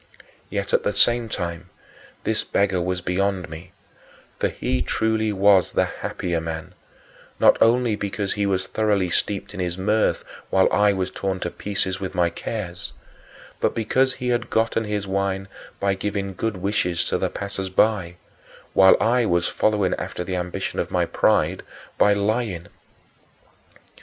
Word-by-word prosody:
Yet, 100 0 -3
at - - +4
the 105 - -1
same 120 +3 +3
time, 85 -2 -4 0.5
this - - 0
beggar 100 -2 +1
was 90 +1 -2
beyond 95 0 -1
me, 80 +3 -10 0.7
for - - +2
he - - -2
truly 110 -1 0
was 100 -1 +4
the - - +3
happier 85 -2 -3
man 80 -1 -6 0.7
not - - +6
only 115 -1 +4
because 100 -1 -3
he 100 -1 0
was 95 -1 0
thoroughly 100 -5 0
steeped 100 +2 -1
in 100 - -7
his 90 -1 -2
mirth 105 +3 +1 0.2
while 95 0 +4
I 105 0 +5
was 95 -2 -2
torn 95 -1 -2
to 85 - -2
pieces 95 0 -3
with 95 -1 -5
my 85 -2 +2
cares, 90 -1 -5 0.7
but - - 0
because 130 +4 +2
he 125 -2 -3
had 120 -1 0
gotten 115 0 +1
his 105 -1 -2
wine 95 0 -1 0.3
by 100 0 +1
giving 100 0 -3
good 110 +1 -2
wishes 90 -2 0
to - - -1
the - - 0
passers 100 -1 -4
by 95 -3 +2 0.6
while 95 0 +7
I 120 0 +2
was 85 -1 +2
following 105 -4 +1
after 90 - -4
the 95 +1 -3
ambition 90 0 -3
of - - -1
my - - +1
pride - - +2 0.4
by 105 - +6
lying. 100 -4 -1
100 Hz, 155 wpm, -23 LUFS, 90-105 Hz, 0.7 s, while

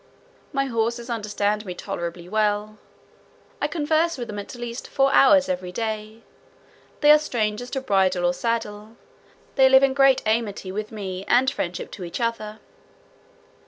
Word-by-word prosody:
My 275 -1 0
horses 235 0 -2
understand 210 -1 -1
me 180 -4 -6
tolerably 170 0 -6
well; 210 +1 -1 0.8
I - - +1
converse 320 +1 0
with 240 -2 -6
them 205 -1 -5
at 205 - -8
least 240 0 -6
four 270 0 +2
hours 275 +1 +6
every 180 0 -3
day. 220 +2 -5 0.8
They 295 0 +7
are 300 - +7
strangers 240 -4 -2
to 270 - -3
bridle 190 -6 +1
or 175 - +2
saddle; 220 0 -3 0.6
they 265 -1 +6
live 265 0 +6
in 270 -1 +3
great 270 -1 +4
amity 215 -4 -1
with 215 +2 -5
me 190 -3 -5
and 260 +2 +4
friendship 180 -8 -4
to 190 - -8
each 170 - -6
other. 220 -2 -3
220 Hz, 155 wpm, -23 LUFS, 205-260 Hz, 0.8 s, They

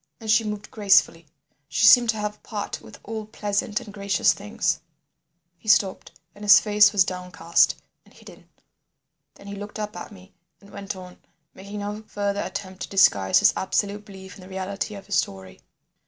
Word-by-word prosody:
And 220 -2 -2
she 215 +1 +4
moved 210 -1 -6
gracefully, 195 -6 +3 0.4
she - - +2
seemed 240 +3 +7
to 220 - +1
have 210 0 -4
part 205 -2 -5
with - - -14
all 220 0 -6
pleasant 205 0 -2
and 225 -4 -12
gracious 200 -1 +2
things—" 210 +3 -2 0.8
He 220 - -18
stopped, 195 -2 +2 0.2
and 205 - -13
his 210 0 +8
face 210 0 +4
was 200 -3 +4
downcast 180 -3 +1 0.3
and - - -24
hidden. - - -16 0.9
Then - - -16
he 200 - -7
looked 205 +2 -8
up 210 0 -5
at - - -8
me 190 -1 -16 0.3
and 200 - -18
went 200 0 -6
on, 180 -1 -12 0.3
making 200 +2 -8
no 205 +1 -5
further 200 0 -2
attempt 190 -1 -6
to - - -5
disguise 100 - +4
his - - +5
absolute 205 +2 -1
belief 190 -2 -12
in - - -14
the 185 - -13
reality 195 +2 -4
of 200 -1 -10
his 200 -1 -1
story. 95 -1 -4
200 Hz, 180 wpm, -24 LUFS, 190-210 Hz, 0.9 s, his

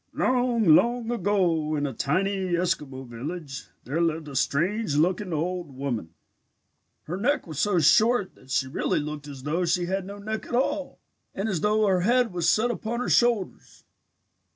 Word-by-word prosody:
"Long, 245 -3 +1
long 235 +8 +4
ago 180 -9 +1
in 145 -1 -1
a 135 - -3
tiny 185 - -1
Eskimo 150 -7 -2
village, 135 +4 -7 0.2
there 145 +7 -2
lived 160 -2 -1
a 140 - -9
strange 170 +7 0
looking 180 +5 +1
old 170 -2 -3
woman. 120 -12 -4 0.9
Her 175 +4 -5
neck 280 +9 0
was 155 -4 -6
so 200 +2 +2
short 210 +6 +4
that 130 - -21
she 135 - +1
really 130 - -1
looked 150 0 -6
as 135 -3 -9
though 160 +5 -1
she 175 +1 +1
had 190 +1 -2
no 200 +1 -8
neck 215 +2 -5
at - - -3
all 275 +2 -1 0.4
and 195 +3 -2
as 185 -7 -1
though 215 +1 +2
her 190 -3 +2
head 240 +1 +2
was 170 -1 +1
set 235 +6 +2
upon 235 +1 -4
her 250 - -2
shoulders. 235 -6 0
180 Hz, 175 wpm, -26 LUFS, 150-215 Hz, 0.9 s, long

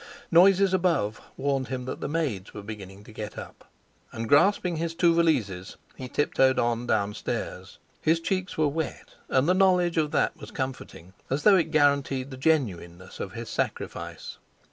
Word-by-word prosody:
Noises 190 +2 +5
above 165 - +1 0.2
warned 135 -1 -1
him 130 -1 -4
that 130 - -6
the - - -2
maids 140 - -3
were 105 - -7
beginning 100 -2 -9
to 110 - -14
get 105 -1 -7
up. - - -10 0.4
And 115 0 -5
grasping 175 - +3
the 170 0 -1
two 170 +1 +3
valises, 115 - 0 0.2
he 130 - -7
tiptoed 135 -2 +2
on 120 0 0
downstairs. 105 -2 -2 0.2
His 165 +1 +2
cheeks 185 +2 -2
were 155 -1 +3
wet, 150 -1 -4 0.2
and 130 +3 +2
the 180 - +4
knowledge 180 -3 +3
of 155 -2 +2
that - - +1
was - - -11
comforting, 130 - -6 0.2
as 140 +3 -1
though 205 - +7
it 170 - +2
guaranteed 140 -2 +2
the 130 - -7
genuineness 95 - -1
of 95 - -5
his 115 0 -6
sacrifice. - - -4
140 Hz, 165 wpm, -26 LUFS, 110-165 Hz, 0.4 s, though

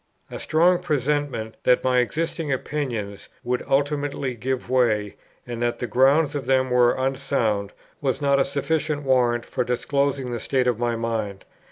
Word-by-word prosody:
A - - -6
strong 175 +3 +3
presentiment 145 -7 -1
that 125 - +3
my 125 -1 +3
existing 160 +4 -1
opinions 125 -7 -3
would 125 0 -1
ultimately 140 -1 0
give 125 +2 -3
way, 115 -5 +1 0.3
and 120 -1 -6
that 120 0 0
the - - -3
grounds 140 +5 +3
of 140 -4 -4
them 130 -1 +2
were 125 -1 +4
unsound, 130 -6 -1 0.3
was 135 -3 0
not 140 -1 +2
a - - +5
sufficient 145 +1 -1
warrant 120 -3 +2
for 125 - -2
disclosing 135 +1 -1
the 120 - -3
state 130 +1 0
of 120 -3 +1
my 120 -1 0
mind. 110 -4 -3
130 Hz, 160 wpm, -23 LUFS, 120-140 Hz, 0.3 s, a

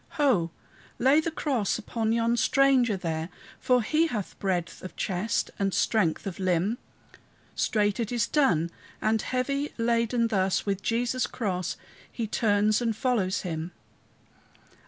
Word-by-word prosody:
Ho! 245 - +3 0.5
lay 270 +5 +5
the 315 - -1
cross 270 -10 -1
upon 225 0 -2
yon 230 +1 +2
stranger 255 -3 +3
there, 165 -2 -3 0.3
For 250 -2 +2
he 315 +8 +2
hath 215 - -5
breadth 180 -3 -2
of 185 - -9
chest 195 +3 -1
and 195 -1 0
strength 185 -8 +1
of 195 -2 -5
limb. 185 +5 +1 0.7
Straight 210 -2 +1
it 230 -1 -2
is 240 -3 +1
done; 170 - +2 0.3
and 220 0 +1
heavy 275 +3 -1
laden 230 0 +1
thus, 190 -3 +1
With 200 -1 -1
Jesus' 245 +4 0
cross, 185 -6 -3 0.3
he 230 - -3
turns 210 0 +2
and 230 -2 0
follows 220 -6 0
him. 165 -1 -4
220 Hz, 135 wpm, -27 LUFS, 190-245 Hz, 0.7 s, lay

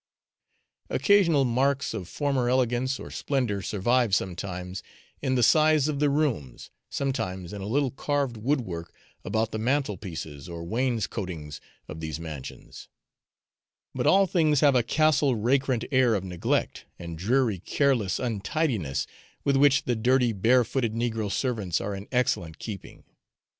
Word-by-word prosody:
Occasional 170 -9 +4
marks 135 +3 +1
of 95 -6 -6
former 135 -4 0
elegance 130 +1 +1
or - - -9
splendour 125 -8 -1
survive 110 +3 +1
sometimes 90 0 -4 0.4
in 130 -2 0
the 125 - +2
size 155 +2 +4
of 150 -2 -2
the 145 -1 +3
rooms, 135 - -2 0.2
sometimes 95 -10 -3
in 100 - -6
a 95 - -5
little 135 +3 +1
carved 140 -2 -1
wood 130 +6 0
work 85 -6 -6 0.3
about 110 +2 -1
the 110 - -3
mantelpieces 95 - -3
or 85 -1 -6
wainscoatings 100 - -3 0.3
of 75 - -8
these 80 -1 -4
mansions; 80 -5 -9 1.0
but - - -1
all 195 +1 +6
things 155 -6 +2
have 145 -2 +5
a 125 - +4
Castle 150 0 +2
Rackrent 125 +2 +1
air 130 -4 +4
of 95 - -2
neglect, 90 -3 -2
and 85 -1 -7
dreary 110 +3 +1
careless 120 - +1
untidiness, 115 - -1 0.4
with 140 - +2
which 140 0 +4
the 120 - 0
dirty 120 +1 +2
bare 120 +5 +4
footed 115 -2 -2
negro 115 -3 -1
servants 105 - -1
are 100 +1 -3
in 100 +1 -7
excellent 90 -10 0
keeping. 105 -5 -8
120 Hz, 140 wpm, -26 LUFS, 95-135 Hz, 1.0 s, all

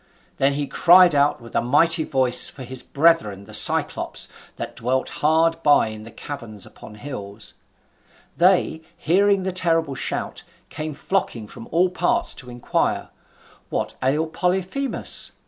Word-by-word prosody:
Then 135 +1 +2
he 145 +1 -2
cried 175 +3 +5
out 145 0 +2
with 115 -1 -13
a - - +2
mighty 160 +7 +2
voice 130 -4 +4
for 135 - -10
his 130 +1 -3
brethren 140 -11 +1
the 110 - -13
Cyclops, 105 - +3 0.3
that - - -7
dwelt 130 +3 -1
hard 165 +2 +2
by 145 -7 +4
in 110 +1 -9
caverns 115 -9 -7
upon 105 - -14
hills; 105 -4 -8 0.8
they, 175 -2 +2 0.2
hearing 195 +3 +2
the 190 - -2
terrible 165 -5 0
shout, - - -4 0.3
came 155 -1 -6
flocking 125 - -3
from 115 - -12
all 180 +3 +2
parts 180 -1 0
to 125 - -10
inquire, 120 0 -2 0.6
What - - -3
ailed 155 +5 0
Polyphemus? 190 +10 -1
145 Hz, 140 wpm, -22 LUFS, 120-170 Hz, 0.8 s, cried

